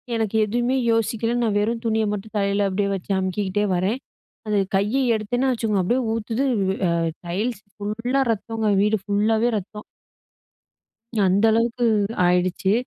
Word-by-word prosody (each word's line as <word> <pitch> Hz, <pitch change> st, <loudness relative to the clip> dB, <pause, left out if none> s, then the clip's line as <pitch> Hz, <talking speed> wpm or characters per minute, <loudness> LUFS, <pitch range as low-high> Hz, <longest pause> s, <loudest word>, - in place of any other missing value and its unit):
எனக்கு 220 Hz, -1 st, -1 dB
எதுமே 240 Hz, +4 st, 0 dB
யோசிக்கல. 225 Hz, +1 st, 0 dB
நான் 215 Hz, -3 st, 0 dB
வெறும் 230 Hz, +2 st, -1 dB
துணிய 220 Hz, -1 st, +1 dB
மட்டும் 210 Hz, +2 st, -6 dB
தலையில 200 Hz, 0 st, +1 dB
அப்டியே 200 Hz, +1 st, 0 dB
வைச்சு 195 Hz, +1 st, -5 dB
அமுக்கிக்கிட்டே 190 Hz, +2 st, -1 dB
வரேன். 195 Hz, +8 st, 0 dB, 0.5 s
அந்த 210 Hz, -1 st, +1 dB, 0.2 s
கைய 210 Hz, +8 st, +1 dB
எடுத்தேன்னா 245 Hz, +5 st, 0 dB
வைச்சுக்கோங்க, 220 Hz, -5 st, 0 dB
அப்டியே 245 Hz, +8 st, +1 dB
ஊத்துது, 230 Hz, +3 st, -2 dB, 0.3 s
வ் 190 Hz, -, 0 dB, 0.3 s
எ -, -, -4 dB
டைல்ஸ் 205 Hz, +6 st, -2 dB, 0.2 s
ஃபுல்லா 235 Hz, +6 st, -1 dB
ரத்தோங்க, 225 Hz, 0 st, -2 dB
வீடு 210 Hz, +1 st, +2 dB
ஃபுல்லாவே 220 Hz, +3 st, +1 dB
ரத்தம். 210 Hz, +2 st, -7 dB, 1.4 s
அந்த 195 Hz, +4 st, +2 dB
அளவுக்கு 235 Hz, +2 st, +1 dB, 0.4 s
ஆயிடுச்சு. 180 Hz, +2 st, +1 dB
215 Hz, 135 wpm, -23 LUFS, 200-230 Hz, 1.4 s, வீடு